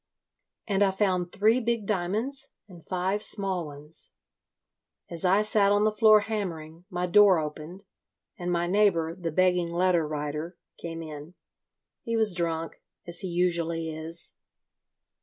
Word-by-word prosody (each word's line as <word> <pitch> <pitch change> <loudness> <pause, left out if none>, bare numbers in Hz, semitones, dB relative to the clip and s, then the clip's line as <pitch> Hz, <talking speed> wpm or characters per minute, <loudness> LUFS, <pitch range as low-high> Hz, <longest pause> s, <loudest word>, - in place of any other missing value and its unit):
And 200 -2 -1
I 200 - +5
found 185 -3 -1
three 220 +5 +3
big 230 -2 -1
diamonds 220 +9 -2 0.2
and 175 -4 -14
five 185 +3 -2
small 190 -6 +2
ones. 150 +2 -9 1.0
As 170 -1 -4
I 190 +3 +3
sat 210 -2 +3
on 205 0 +3
the 215 - +3
floor 215 0 +5
hammering, 175 -6 -5
my 180 -2 -2
door 195 +1 +5
opened, 155 +5 -6 0.5
and 175 -1 -4
my 170 0 0
neighbour, 175 -4 +2
the 170 -2 -5
begging 180 0 +2
letter 175 -2 +1
writer 150 +3 -5 0.2
came 165 -1 -7
in. 155 +2 -10 0.7
He 230 0 -2
was 220 -3 +7
drunk—as 170 0 -4
he 190 - -1
usually 170 -2 -1
is. 160 +2 -1
180 Hz, 140 wpm, -27 LUFS, 165-205 Hz, 1.0 s, was